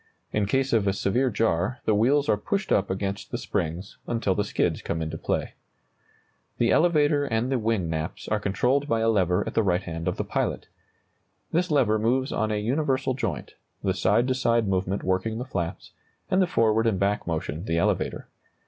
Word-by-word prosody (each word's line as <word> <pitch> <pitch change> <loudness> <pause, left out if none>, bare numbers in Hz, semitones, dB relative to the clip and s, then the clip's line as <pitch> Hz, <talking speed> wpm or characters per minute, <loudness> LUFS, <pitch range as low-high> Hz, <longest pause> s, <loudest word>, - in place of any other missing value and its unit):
In 105 -2 +1
case 135 +4 +1
of 105 -3 +3
a 100 - +2
severe 120 +7 +1
jar, 110 0 0
the 110 - +3
wheels 135 +8 +3
are 105 - +4
pushed 195 - -3
up 100 0 +2
against 95 +1 -3
the - - -3
springs 85 +5 -3
until 115 -5 0
the 105 - 0
skids 105 - 0
come 85 - -3
into 80 0 -3
play. - - -2 1.0
The 120 - +2
elevator 150 -3 +3
and 120 0 -1
the 130 - +1
wing 110 -5 0
naps 80 0 -4
are 105 - 0
controlled 125 +8 +1
by 115 -5 +1
a 115 - +3
lever 90 -5 +2
at - - -5
the - - +3
right 95 -2 +1
hand 80 -2 -5
of - - -1
the - - -1
pilot. - - -2 0.8
This 180 +2 +1
lever 120 -8 +3
moves 130 +4 +1
on 110 0 0
a 110 - 0
universal 130 +3 0
joint, 130 - -4 0.3
the 95 -2 +1
side 105 +6 +2
to - - +3
side 115 -3 +1
movement 95 +1 -1
working 95 +4 0
the 125 - -4
flaps, 85 -10 -4 0.4
and 185 - +4
the 185 - +3
forward 115 -7 +2
and 100 -5 +1
back 100 0 0
motion 80 +1 -3
the 85 - 0
elevator. 85 - 0
110 Hz, 195 wpm, -26 LUFS, 95-130 Hz, 1.0 s, are